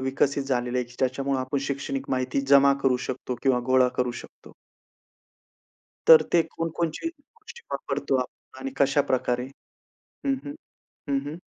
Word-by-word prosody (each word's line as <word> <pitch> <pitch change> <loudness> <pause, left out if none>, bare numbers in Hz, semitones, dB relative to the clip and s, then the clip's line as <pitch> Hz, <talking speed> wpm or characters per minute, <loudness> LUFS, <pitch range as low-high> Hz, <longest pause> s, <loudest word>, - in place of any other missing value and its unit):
विकसित 135 +2 0
झालेल्या 125 -2 0
आहेत, 120 0 -13
त्याच्यामुळं 135 +1 0
आपण 130 +2 -2
शैक्षणिक 135 0 -3
माहिती 130 +1 0
जमा 140 0 +7
करू 130 -2 +3
शकतो 130 0 -4
किंवा 130 -3 +3
गोळा 130 -1 +4
करू 125 -1 +1
शकतो? - - -16 1.6
तर 480 -1 +10
ते 170 - +5
कोणकोणचे 165 - -2
गोष्टी 425 - -15
वापरतो 140 -1 -1
आप 125 +1 -9
आणि 135 0 -4
कशाप्रकारे? 130 -3 +1 0.8
हं, 275 - +3
हं. 285 - -6 0.5
हं, 140 - +2
हं. 150 +3 -5
135 Hz, 135 wpm, -26 LUFS, 130-145 Hz, 1.6 s, तर